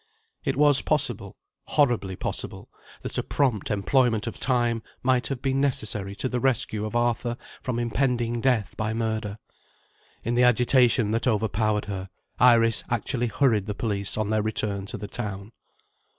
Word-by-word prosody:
It -, -, -1 dB
was 145 Hz, -1 st, +5 dB
possible, 120 Hz, -10 st, -1 dB, 0.3 s
horribly 120 Hz, -10 st, +1 dB
possible, -, -, -5 dB, 0.3 s
that -, -, -2 dB
a -, -, -2 dB
prompt 125 Hz, -9 st, 0 dB
employment 110 Hz, +2 st, +1 dB
of 115 Hz, -, -6 dB
time 120 Hz, -3 st, +1 dB, 0.2 s
might 130 Hz, -1 st, +2 dB
have 135 Hz, -1 st, -5 dB
been 135 Hz, 0 st, +1 dB
necessary 105 Hz, -7 st, -1 dB
to 115 Hz, -, -2 dB
the 125 Hz, -1 st, -2 dB
rescue 115 Hz, -4 st, 0 dB
of 110 Hz, -, -7 dB
Arthur 120 Hz, 0 st, 0 dB, 0.2 s
from 125 Hz, -3 st, -3 dB
impending 120 Hz, -1 st, 0 dB
death 120 Hz, -6 st, 0 dB
by 110 Hz, 0 st, -2 dB
murder. 110 Hz, -2 st, -2 dB, 0.9 s
In 115 Hz, -, 0 dB
the 120 Hz, -, +2 dB
agitation 125 Hz, -2 st, +4 dB
that 115 Hz, +3 st, 0 dB
overpowered 110 Hz, -1 st, 0 dB
her, 95 Hz, -2 st, -5 dB, 0.3 s
Iris 115 Hz, -2 st, +5 dB
actually 120 Hz, +1 st, -1 dB
hurried 110 Hz, -5 st, +1 dB
the 105 Hz, -, -3 dB
police 100 Hz, -2 st, 0 dB
on 110 Hz, -1 st, -1 dB
their 110 Hz, 0 st, +2 dB
return 105 Hz, -2 st, -2 dB
to -, -, -5 dB
the 105 Hz, 0 st, -7 dB
town. 100 Hz, -1 st, -4 dB
115 Hz, 155 wpm, -25 LUFS, 105-125 Hz, 0.9 s, was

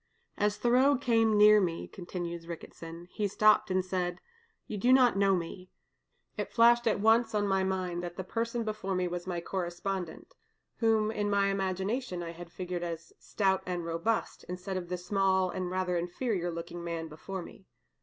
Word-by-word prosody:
"As 210 Hz, 0 st, +1 dB
Thoreau 255 Hz, +4 st, +4 dB
came 225 Hz, -4 st, +3 dB
near 210 Hz, 0 st, +7 dB
me," 170 Hz, -3 st, -2 dB
continues 175 Hz, -2 st, -6 dB
Mr. -, -, -12 dB
Ricketson, 165 Hz, 0 st, -8 dB
"he 210 Hz, -2 st, -1 dB
stopped 215 Hz, +2 st, +4 dB
and 185 Hz, 0 st, +1 dB
said, 180 Hz, -1 st, -2 dB, 0.5 s
'You 210 Hz, -, -5 dB
do 245 Hz, +6 st, +3 dB
not 255 Hz, -3 st, +6 dB
know 195 Hz, -1 st, +4 dB
me.' 180 Hz, +1 st, -5 dB, 0.7 s
It -, -, -3 dB
flashed 235 Hz, 0 st, +5 dB
at 215 Hz, -, +2 dB
once 225 Hz, +2 st, +3 dB
on 205 Hz, -1 st, +1 dB
my 195 Hz, -1 st, +2 dB
mind 185 Hz, -2 st, -1 dB
that 175 Hz, -1 st, -6 dB
the 190 Hz, -, -4 dB
person 230 Hz, +4 st, -2 dB
before 210 Hz, -3 st, -3 dB
me 180 Hz, 0 st, 0 dB
was 175 Hz, +1 st, -5 dB
my 175 Hz, -2 st, -2 dB
correspondent, 180 Hz, -, -4 dB, 0.4 s
whom 220 Hz, -2 st, +2 dB
in 205 Hz, -1 st, -1 dB
my 200 Hz, -1 st, +3 dB
imagination 190 Hz, +1 st, -2 dB
I 165 Hz, -, -5 dB
had 170 Hz, 0 st, -10 dB
figured 180 Hz, -1 st, -4 dB
as 170 Hz, -1 st, -6 dB
stout 190 Hz, -2 st, +1 dB
and 175 Hz, -2 st, -2 dB
robust, 170 Hz, +7 st, -1 dB
instead 180 Hz, +2 st, -4 dB
of 175 Hz, -2 st, -4 dB
the 180 Hz, -, -2 dB
small 190 Hz, 0 st, +1 dB
and 185 Hz, -1 st, -3 dB
rather 185 Hz, -1 st, -1 dB
inferior 180 Hz, +1 st, -2 dB
looking 170 Hz, +1 st, -6 dB
man 165 Hz, -1 st, -4 dB
before 175 Hz, +4 st, -6 dB
me. 190 Hz, +2 st, -14 dB
190 Hz, 180 wpm, -30 LUFS, 175-210 Hz, 0.7 s, near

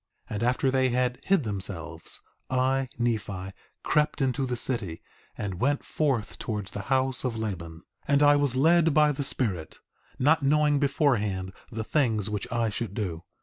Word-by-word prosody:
And 105 Hz, -, -4 dB
after 125 Hz, +2 st, +2 dB
they 130 Hz, -1 st, +3 dB
had 125 Hz, 0 st, 0 dB
hid 195 Hz, -6 st, +3 dB
themselves, 100 Hz, -6 st, -5 dB, 0.3 s
I, 130 Hz, 0 st, +1 dB
Nephi, 105 Hz, -5 st, -2 dB, 0.3 s
crept 150 Hz, 0 st, +1 dB
into 135 Hz, 0 st, 0 dB
the 125 Hz, -, -1 dB
city 110 Hz, -9 st, -2 dB, 0.4 s
and 95 Hz, -4 st, -4 dB
went 140 Hz, +2 st, +1 dB
forth 135 Hz, -8 st, -1 dB
towards 105 Hz, -4 st, -4 dB
the -, -, -5 dB
house 130 Hz, -1 st, +2 dB
of 125 Hz, -3 st, -2 dB
Laban. 85 Hz, -7 st, -5 dB
4:6 -, -, -34 dB, 0.2 s
And 140 Hz, 0 st, +4 dB
I 145 Hz, 0 st, +7 dB
was 145 Hz, -3 st, +2 dB
led 165 Hz, +2 st, +4 dB
by 150 Hz, -1 st, +5 dB
the 140 Hz, 0 st, -3 dB
Spirit, 100 Hz, -12 st, -2 dB, 0.4 s
not 155 Hz, +4 st, +4 dB
knowing 145 Hz, +1 st, +3 dB
beforehand 105 Hz, -, +1 dB, 0.2 s
the 110 Hz, -1 st, -3 dB
things 110 Hz, -6 st, +1 dB
which 105 Hz, +3 st, -3 dB
I 115 Hz, -1 st, +1 dB
should 115 Hz, +3 st, -4 dB
do. 90 Hz, -7 st, -3 dB
125 Hz, 165 wpm, -27 LUFS, 105-140 Hz, 0.4 s, I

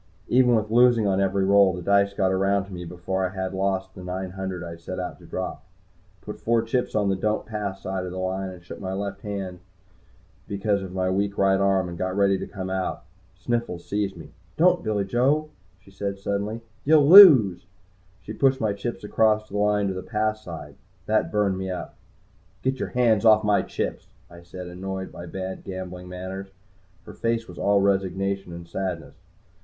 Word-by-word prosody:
Even 125 Hz, -1 st, +4 dB
with 110 Hz, -1 st, -1 dB
losing 120 Hz, -1 st, +5 dB
on 95 Hz, -1 st, +2 dB
every 95 Hz, 0 st, +1 dB
roll, 100 Hz, -1 st, +5 dB
the 90 Hz, -, -6 dB
dice 100 Hz, +1 st, +3 dB
got 95 Hz, -1 st, +1 dB
around 95 Hz, +1 st, +1 dB
to 100 Hz, -, -12 dB
me 90 Hz, -1 st, -6 dB
before 90 Hz, +2 st, -3 dB
I 95 Hz, -, 0 dB
had 95 Hz, 0 st, -3 dB
lost 95 Hz, 0 st, -1 dB
the 90 Hz, -, -10 dB
nine 90 Hz, +1 st, -4 dB
hundred 95 Hz, -1 st, -5 dB
I 85 Hz, -, -7 dB
had 85 Hz, 0 st, -11 dB
set 95 Hz, +2 st, -6 dB
out 90 Hz, -1 st, -5 dB
to -, -, -15 dB
drop. -, -, -5 dB
I -, -, -34 dB
put -, -, -7 dB
four 115 Hz, 0 st, +1 dB
chips 125 Hz, +2 st, -1 dB
on 105 Hz, -2 st, +2 dB
the 95 Hz, -, +1 dB
"Don't 105 Hz, +3 st, -1 dB
Pass" 105 Hz, -3 st, -5 dB
side 95 Hz, 0 st, -3 dB
of 90 Hz, -, -5 dB
the 90 Hz, -, -7 dB
line, 95 Hz, 0 st, -3 dB
shook 85 Hz, -, -10 dB
left 95 Hz, +1 st, -4 dB
handed 95 Hz, -3 st, -5 dB, 0.9 s
because 100 Hz, 0 st, 0 dB
of 95 Hz, -1 st, -7 dB
my 95 Hz, 0 st, 0 dB
weak 100 Hz, +1 st, -1 dB
right 95 Hz, 0 st, +3 dB
arm, 95 Hz, -2 st, +2 dB
and 85 Hz, -1 st, -8 dB
got 95 Hz, +1 st, -2 dB
ready 100 Hz, -1 st, +3 dB
to -, -, -5 dB
come 95 Hz, -1 st, -6 dB
out. 95 Hz, -1 st, -2 dB, 0.3 s
Sniffles 115 Hz, -8 st, -3 dB
seized 100 Hz, -2 st, -2 dB
me. 80 Hz, -3 st, -11 dB, 0.3 s
"Don't 180 Hz, +2 st, +4 dB
Billy 105 Hz, -2 st, 0 dB
Joe!" 135 Hz, +9 st, +1 dB, 0.3 s
she 95 Hz, +1 st, -19 dB
said 100 Hz, 0 st, -4 dB
suddenly. 100 Hz, +3 st, -3 dB, 0.2 s
"You'll 150 Hz, -1 st, +5 dB
lose!" 130 Hz, -, +9 dB, 0.6 s
She 110 Hz, -, -7 dB
pushed 135 Hz, +3 st, +2 dB
my 110 Hz, -4 st, 0 dB
chips 105 Hz, +4 st, -5 dB
across 110 Hz, 0 st, +2 dB
the 105 Hz, -, -4 dB
line 105 Hz, -1 st, +2 dB
to 95 Hz, -, -1 dB
the 95 Hz, -, -5 dB
"Pass" 110 Hz, 0 st, -2 dB
side. 80 Hz, -5 st, -9 dB, 0.3 s
That 110 Hz, +2 st, +1 dB
burned 100 Hz, -3 st, +1 dB
me 95 Hz, 0 st, -4 dB
up. 90 Hz, -, -5 dB, 0.7 s
"Get 130 Hz, 0 st, 0 dB
your -, -, -3 dB
hands 115 Hz, -4 st, +2 dB
off 110 Hz, -1 st, +6 dB
my 105 Hz, -1 st, +3 dB
chips," -, -, -4 dB, 0.2 s
I 85 Hz, 0 st, -12 dB
said, 90 Hz, +1 st, -9 dB
annoyed 95 Hz, +2 st, -6 dB
by 85 Hz, -, -9 dB
bad 95 Hz, +2 st, -6 dB
gambling 90 Hz, -1 st, -7 dB
manners. 95 Hz, +2 st, -6 dB, 0.6 s
Her -, -, -10 dB
face 115 Hz, 0 st, -1 dB
was 90 Hz, -, -11 dB
all 100 Hz, 0 st, +3 dB
resignation 95 Hz, -1 st, 0 dB
and 85 Hz, 0 st, -9 dB
sadness. 90 Hz, -3 st, -4 dB
95 Hz, 200 wpm, -25 LUFS, 95-105 Hz, 0.9 s, lose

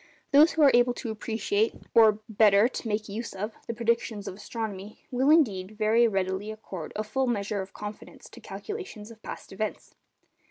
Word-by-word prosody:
Those 295 Hz, +3 st, +7 dB
who 320 Hz, -, +3 dB
are 280 Hz, -, +8 dB
able 245 Hz, 0 st, +4 dB
to 230 Hz, -, -4 dB
appreciate 220 Hz, 0 st, -1 dB, 0.2 s
(or 220 Hz, -2 st, +6 dB
better, 210 Hz, -1 st, +5 dB
to 255 Hz, -, -6 dB
make 215 Hz, 0 st, -1 dB
use 220 Hz, +3 st, -5 dB
of) 210 Hz, +3 st, -4 dB
the 230 Hz, -, -2 dB
predictions 230 Hz, -2 st, -1 dB
of -, -, -4 dB
astronomy, 210 Hz, 0 st, -6 dB
will, 260 Hz, +3 st, +2 dB
indeed, 215 Hz, -, +3 dB
very 225 Hz, +2 st, +4 dB
readily 195 Hz, 0 st, -1 dB
accord 195 Hz, -7 st, -7 dB
a 215 Hz, -, -1 dB
full 265 Hz, +5 st, -1 dB
measure 205 Hz, -3 st, -1 dB
of 190 Hz, 0 st, -9 dB
confidence 210 Hz, 0 st, -9 dB
to -, -, -14 dB
calculations 375 Hz, -, -7 dB
of 220 Hz, -1 st, -15 dB
past -, -, -8 dB
events. 215 Hz, +2 st, -4 dB
215 Hz, 175 wpm, -27 LUFS, 205-235 Hz, 0.2 s, are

